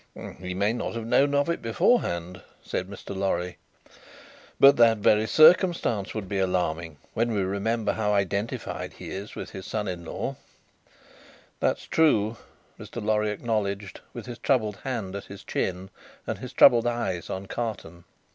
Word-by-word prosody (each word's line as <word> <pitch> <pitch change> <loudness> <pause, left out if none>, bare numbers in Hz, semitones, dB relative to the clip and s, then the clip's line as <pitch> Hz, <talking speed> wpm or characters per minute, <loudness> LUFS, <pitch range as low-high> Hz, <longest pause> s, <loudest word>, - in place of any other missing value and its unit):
"He 90 0 -5
may 100 +4 +1
not 120 - -4
have 115 -1 -4
known 140 +4 +3
of 140 +2 +2
it 170 - -1
beforehand," 90 - +1 0.2
said 90 - -3
Mr. 100 0 -8
Lorry. 90 -2 -2 1.0
"But 140 +1 +8
that 115 -1 +6
very 105 +1 +3
circumstance 155 - +4
would 105 -3 -4
be 100 0 -2
alarming, 85 -4 -1 0.2
when 115 +1 0
we 100 -3 0
remember 105 +4 -1
how 105 -2 0
identified 100 +3 -2
he - - -9
is 100 +2 -6
with - - -7
his 95 - -8
son 105 -2 -2
in 90 -2 -4
law." 80 - -4 1.2
"That's - - 0
true," 115 -9 +2 0.4
Mr. - - -7
Lorry 105 -1 +1
acknowledged, 105 -2 -2
with - - -8
his 120 -1 -8
troubled 110 -7 +1
hand 110 -7 -4
at 100 - -6
his 100 0 -11
chin, 95 +1 -3 0.3
and - - -4
his - - -7
troubled 120 -1 +6
eyes 105 -8 -2
on 95 +1 -4
Carton. 95 -7 -5
105 Hz, 155 wpm, -26 LUFS, 95-115 Hz, 1.2 s, But